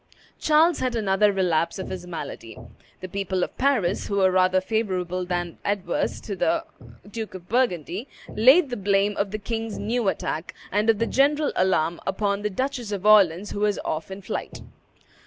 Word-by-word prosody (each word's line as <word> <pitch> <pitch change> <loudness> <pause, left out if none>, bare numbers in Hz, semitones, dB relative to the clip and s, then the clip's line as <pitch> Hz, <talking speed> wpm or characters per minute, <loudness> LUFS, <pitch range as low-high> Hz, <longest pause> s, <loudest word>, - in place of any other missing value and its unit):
Charles 315 +3 +4
had 255 -2 -1
another 205 -1 +3
relapse 180 -4 0
of 190 - -5
his 180 -1 -6
malady. 145 -9 -7 0.4
The 185 - -5
people 190 -1 -2
of - - -5
Paris, 245 -9 +1
who 200 - -2
were 190 -2 +4
rather 185 0 +3
favorable 185 -3 -2
than 175 -1 -3
adverse 200 -4 -1
to 200 - -5
the 330 - +1 0.4
Duke 220 -1 -6
of 180 -1 -10
Burgundy, 210 - -1 0.2
laid 265 +6 +5
the 245 - -2
blame 200 +1 +1
of 200 0 -1
the 215 - -3
king's 225 +1 -4
new 235 -1 -1
attack, 160 -3 -2 0.2
and 210 +2 +1
of 225 - +4
the 230 - +1
general 290 +4 +2
alarm, 175 -3 +1
upon 200 0 0
the 210 - -1
Duchess 250 +1 -3
of 200 -1 -4
Orleans, 200 -3 +5
who - - -4
was 210 -1 +1
off 155 +3 -3
in 190 +1 -8
flight. - - -5
200 Hz, 175 wpm, -24 LUFS, 185-225 Hz, 0.4 s, laid